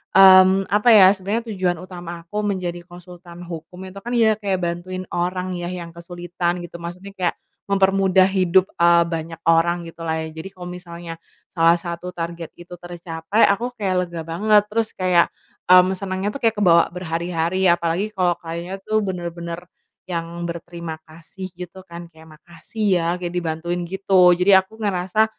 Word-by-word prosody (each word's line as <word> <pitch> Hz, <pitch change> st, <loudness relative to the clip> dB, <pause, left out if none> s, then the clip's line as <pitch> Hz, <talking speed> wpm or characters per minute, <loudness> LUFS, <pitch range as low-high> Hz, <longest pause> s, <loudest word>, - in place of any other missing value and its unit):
mmm, 190 Hz, 0 st, +7 dB
apa 210 Hz, +4 st, +1 dB
ya, 190 Hz, -2 st, +8 dB
sebenernya 210 Hz, +4 st, -3 dB
tujuan 185 Hz, -3 st, 0 dB
utama 175 Hz, -2 st, -8 dB
aku 210 Hz, +4 st, -3 dB
menjadi 180 Hz, -3 st, -3 dB
konsultan 175 Hz, 0 st, -12 dB
hukum 175 Hz, +2 st, -9 dB
itu 195 Hz, -, -10 dB
kan 240 Hz, +4 st, -4 dB
ya 220 Hz, -2 st, +3 dB
kayak 195 Hz, -3 st, -2 dB
bantuin 175 Hz, +2 st, -4 dB
orang 180 Hz, +1 st, -2 dB
yah 175 Hz, -1 st, -4 dB
yang 175 Hz, -2 st, -6 dB
kesulitan 175 Hz, +1 st, -4 dB
gitu, 170 Hz, 0 st, -9 dB
maksudnya 180 Hz, +4 st, -8 dB
kayak 185 Hz, -3 st, -2 dB, 0.3 s
mempermudah 195 Hz, -1 st, +3 dB
hidup, 190 Hz, -1 st, +2 dB
eee, 170 Hz, 0 st, +5 dB
banyak 165 Hz, -1 st, -5 dB
orang 170 Hz, +1 st, +3 dB
gitulah 165 Hz, -1 st, -4 dB
ya. 160 Hz, -, -5 dB
Jadi 160 Hz, +3 st, -8 dB
kalo 180 Hz, -1 st, -9 dB
misalnya 170 Hz, -2 st, -8 dB, 0.4 s
salah 165 Hz, +1 st, +4 dB
satu 175 Hz, +1 st, -6 dB
target 170 Hz, -1 st, -6 dB
itu 175 Hz, +1 st, -12 dB
tercapai, 175 Hz, +3 st, -3 dB
aku 235 Hz, +5 st, -1 dB
kayak 200 Hz, -6 st, -2 dB
lega 170 Hz, -1 st, -7 dB
banget 205 Hz, +6 st, +3 dB
terus 225 Hz, 0 st, -1 dB
kayak, 180 Hz, -2 st, +2 dB, 0.3 s
mmm, 185 Hz, +1 st, +5 dB
senengnya 190 Hz, +1 st, -3 dB
tuh 210 Hz, -, -5 dB
kayak 220 Hz, -2 st, +1 dB
kebawa 170 Hz, -3 st, +5 dB
berhari-hari 170 Hz, +1 st, -2 dB
apalagi 175 Hz, +4 st, +1 dB
kalo 180 Hz, -3 st, +1 dB
kliennya 170 Hz, +3 st, -6 dB
tuh 215 Hz, 0 st, +1 dB
bener-bener 175 Hz, -2 st, -5 dB, 0.4 s
yang 170 Hz, -1 st, -5 dB
berterima 170 Hz, -1 st, -7 dB
kasih 170 Hz, +4 st, -10 dB
gitu 180 Hz, +1 st, -9 dB
kan 170 Hz, 0 st, -8 dB
kayak, 160 Hz, -1 st, -16 dB
"Makasih 170 Hz, +7 st, -8 dB, 0.2 s
ya 165 Hz, -, -1 dB
kayak 175 Hz, -1 st, -5 dB
dibantuin 170 Hz, 0 st, -2 dB
gitu." 185 Hz, -2 st, +4 dB
Jadi 180 Hz, +2 st, +3 dB
aku 190 Hz, +3 st, +3 dB
ngerasa, 200 Hz, 0 st, +1 dB
180 Hz, 160 wpm, -21 LUFS, 170-190 Hz, 0.4 s, ya